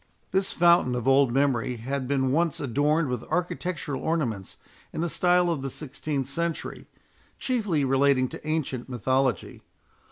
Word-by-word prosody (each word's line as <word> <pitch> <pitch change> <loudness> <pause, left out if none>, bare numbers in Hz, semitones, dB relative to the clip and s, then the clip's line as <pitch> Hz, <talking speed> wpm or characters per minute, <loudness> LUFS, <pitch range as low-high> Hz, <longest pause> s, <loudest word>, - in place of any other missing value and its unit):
This 190 0 +1
fountain 170 -7 +4
of 120 0 -3
old 135 -1 +5
memory 125 -2 +1
had 130 +3 -4
been 130 -1 +1
once 165 +1 +1
adorned 145 +4 +1
with 125 -3 -2
architectural 165 -4 -3
ornaments 120 - -2 0.3
in - - -4
the 170 - 0
style 180 +1 +3
of 155 -5 -2
the 135 - -3
sixteenth 140 0 -4
century, 165 +5 -4 0.5
chiefly 205 - 0
relating 135 -1 +3
to - - -9
ancient 140 -6 -2
mythology. 130 -2 -1
140 Hz, 140 wpm, -26 LUFS, 130-165 Hz, 0.5 s, old